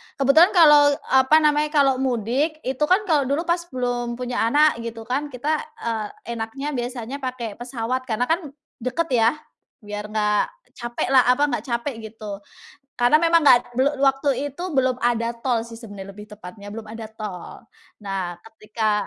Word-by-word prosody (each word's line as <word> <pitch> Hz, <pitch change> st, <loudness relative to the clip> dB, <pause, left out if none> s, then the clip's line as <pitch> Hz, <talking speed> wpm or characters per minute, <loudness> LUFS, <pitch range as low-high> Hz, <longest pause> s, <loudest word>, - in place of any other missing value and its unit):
kebetulan 315 Hz, +8 st, +5 dB
kalau 295 Hz, -4 st, +7 dB, 0.2 s
apa 265 Hz, +3 st, +5 dB
namanya, 300 Hz, 0 st, +3 dB
kalau 270 Hz, -3 st, +4 dB
mudik, 265 Hz, +6 st, -1 dB
itu 260 Hz, 0 st, -3 dB
kan 375 Hz, +5 st, +3 dB
kalau 300 Hz, -8 st, +1 dB
dulu 285 Hz, +4 st, 0 dB
pas 345 Hz, 0 st, +1 dB
belum 245 Hz, -3 st, -2 dB
punya 250 Hz, 0 st, -4 dB
anak 295 Hz, +1 st, +3 dB
gitu 230 Hz, -1 st, -6 dB
kan, 275 Hz, +5 st, -2 dB
kita, 290 Hz, +4 st, -2 dB, 0.2 s
eee, 220 Hz, -2 st, -2 dB, 0.3 s
enaknya 270 Hz, +7 st, -4 dB
biasanya 245 Hz, +1 st, -4 dB
pakai 250 Hz, -5 st, -5 dB
pesawat, 250 Hz, +1 st, -3 dB
karena 230 Hz, 0 st, 0 dB
kan 325 Hz, 0 st, 0 dB, 0.3 s
deket 255 Hz, +7 st, -2 dB
ya, 235 Hz, +2 st, +3 dB, 0.5 s
biar 210 Hz, 0 st, -6 dB
enggak 210 Hz, -1 st, +1 dB, 0.3 s
capek 240 Hz, -1 st, -3 dB
lah 255 Hz, -3 st, +6 dB
apa, 250 Hz, +3 st, +3 dB
enggak -, -, -3 dB
capek, 240 Hz, +1 st, -3 dB, 0.2 s
gitu. 210 Hz, -3 st, -7 dB, 0.6 s
Karena 245 Hz, +3 st, +3 dB
memang 335 Hz, 0 st, +3 dB
nggak 245 Hz, -2 st, +4 dB
belu 270 Hz, +2 st, +4 dB
waktu 270 Hz, +1 st, +3 dB, 0.2 s
itu 315 Hz, +7 st, -9 dB
belum 260 Hz, -1 st, +1 dB
ada 235 Hz, -1 st, +1 dB
tol 235 Hz, -2 st, 0 dB
sih 230 Hz, -, -10 dB
sebenarnya, 205 Hz, -4 st, -9 dB
lebih 210 Hz, +1 st, -11 dB
tepatnya. 200 Hz, 0 st, -11 dB
Belum 225 Hz, -, -6 dB
ada 225 Hz, +1 st, -8 dB
tol. 210 Hz, -5 st, -8 dB, 0.4 s
Nah, 190 Hz, -3 st, -3 dB
ketika 215 Hz, -1 st, -2 dB
245 Hz, 165 wpm, -22 LUFS, 225-285 Hz, 0.6 s, kalau